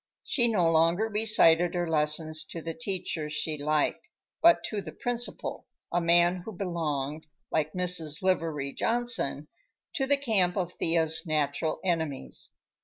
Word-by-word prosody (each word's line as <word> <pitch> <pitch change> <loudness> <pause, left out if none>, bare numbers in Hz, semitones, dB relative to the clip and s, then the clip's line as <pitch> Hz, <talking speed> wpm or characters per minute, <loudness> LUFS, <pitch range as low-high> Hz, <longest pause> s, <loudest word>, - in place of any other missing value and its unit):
She 240 -3 +3
no 195 -7 +2
longer 165 +6 +3
recited 180 -6 +3
her 175 -1 -1
lessons 155 0 0
to 165 - -7
the 165 0 -5
teacher 185 -8 -3
she 155 +1 -2
liked, 150 - 0 0.3
but 335 0 +6
to 210 -2 -3
the 165 -4 -8
Principal, 245 - -3 0.3
a 175 - +2
man 175 +1 +4
who 200 +5 -8
belonged, 155 -5 -3 0.2
like 155 -1 0
Mrs. 175 -3 0
Livery 160 -7 0
Johnson, 230 - -1 0.5
to 270 -2 -1
the 285 +1 +3
camp 205 -10 +1
of 180 -2 -1
Thea's 165 +1 +1
natural 155 0 -1
enemies. 160 -6 -2
170 Hz, 140 wpm, -28 LUFS, 155-195 Hz, 0.5 s, but